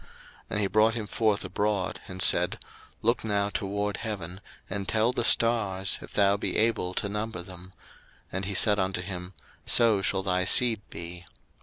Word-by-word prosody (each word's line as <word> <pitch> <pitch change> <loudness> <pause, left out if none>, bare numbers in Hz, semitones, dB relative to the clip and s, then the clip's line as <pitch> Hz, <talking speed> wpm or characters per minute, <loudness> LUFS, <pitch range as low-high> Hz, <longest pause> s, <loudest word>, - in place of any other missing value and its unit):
01:015:005 - - -22 0.4
And 105 - -2
he - - +1
brought 110 +3 +3
him 110 -3 -4
forth 105 0 0
abroad, 100 -3 -2
and 95 -1 -3
said, - - +2 0.5
Look 115 +3 +1
now 100 -2 0
toward 100 0 -3
heaven, 95 -4 -6 0.3
and 95 0 -5
tell 110 +2 +2
the 120 - -2
stars, 105 -6 +3
if - - -12
thou 100 0 +3
be - - -3
able 110 -5 0
to - - -1
number 105 -3 -4
them: 90 0 -12 0.6
and 95 0 -3
he 100 +1 -4
said 105 +1 +5
unto 95 -1 -1
him, 90 -1 -7 0.3
So 110 -4 +4
shall 95 0 0
thy 90 -1 0
seed 115 0 +6
be. 85 0 -9
100 Hz, 175 wpm, -27 LUFS, 95-110 Hz, 0.6 s, seed